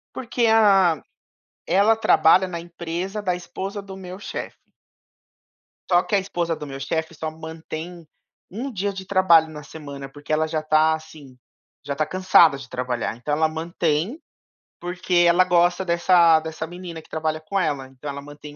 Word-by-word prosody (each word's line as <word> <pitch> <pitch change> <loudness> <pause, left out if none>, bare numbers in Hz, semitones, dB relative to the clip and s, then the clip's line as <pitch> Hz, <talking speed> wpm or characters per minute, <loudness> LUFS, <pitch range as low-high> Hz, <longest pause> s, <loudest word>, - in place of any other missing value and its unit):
Porque, 240 -1 -1
ah, 195 -8 +4 0.6
ela 205 +4 +4
trabalha 185 -3 +4
na 170 -2 -5
empresa 175 +4 -5
da 185 -3 0
esposa 190 +3 -6
do 195 -1 -10
meu 185 -1 -9
chefe. 205 - -7 1.3
Só 175 -1 +5
que 210 - -1
a - - +4
esposa 175 -4 -2
do 150 - -8
meu 135 -1 -7
chefe 160 +4 -3
só 160 0 -4
mantém 160 +1 -8 0.4
1 245 +8 -5
dia 200 -2 -2
de 190 0 -8
trabalho 185 -4 +5
na 150 -1 -9
semana, 145 -2 -9
porque 145 +2 -10
ela 155 +1 +2
já 155 0 -1
está, 155 +1 +3
assim, 155 -5 -10 0.5
já 140 - -3
está 155 +2 0
cansada 175 -3 +4
de 135 -2 -11
trabalhar. 125 -3 -3
Então, 145 +5 -3
ela 155 +1 +2
mantém, 165 - -2 0.6
porque 175 0 +1
ela 175 +2 +5
gosta 175 +1 +2
dessa 170 -1 +5
dessa 160 0 -6
menina 175 -1 -8
que - - -23
trabalha 155 0 -2
com 195 +5 -2
ela. 145 -6 -1
Então, 135 +2 -9
ela 140 0 -5
mantém 145 +1 -11
165 Hz, 170 wpm, -23 LUFS, 155-185 Hz, 1.3 s, Só